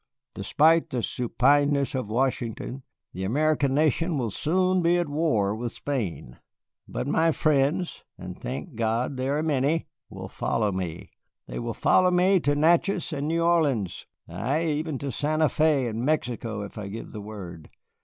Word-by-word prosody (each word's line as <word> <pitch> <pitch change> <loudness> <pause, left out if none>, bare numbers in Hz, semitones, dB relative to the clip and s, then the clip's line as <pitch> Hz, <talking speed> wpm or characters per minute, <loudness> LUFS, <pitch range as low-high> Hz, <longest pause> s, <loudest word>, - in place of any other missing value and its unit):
Despite 160 +2 +3
the 125 -3 -2
supineness 140 +3 +2
of 130 -5 -3
Washington, 125 +1 -2 0.3
the 95 - -5
American 140 +4 +1
nation 155 +2 +1
will 120 -5 -1
soon 185 - +1
be 170 +1 +3
at 175 -2 0
war 130 -10 +1
with 120 +1 -4
Spain. 105 - -4 0.5
But - - -4
my 160 +4 +2
friends 155 +3 +1
and 90 0 -8
thank 130 - -6
God 115 +4 -1
they 130 +1 -2
are 150 +2 0
many 150 +1 0 0.2
will - - -8
follow 110 -3 -1
me 90 -3 -5 0.3
they - - -6
will - - -4
follow 185 0 +4
me 180 +2 +4
to 145 -2 +1
Natchez 170 +3 +2
and 145 0 -2
New 165 +1 +1
Orleans, 145 - +1 0.2
ay, 145 +8 -1
even 155 -1 -1
to 140 +1 -4
Santa 155 +5 +1
Fé 150 -4 +2
and 115 +1 -3
Mexico 120 -7 -1
if 100 +2 -8
I 100 - -5
give 110 +4 -7
the 105 - -7
word. 95 -6 -9
140 Hz, 160 wpm, -26 LUFS, 115-155 Hz, 0.5 s, follow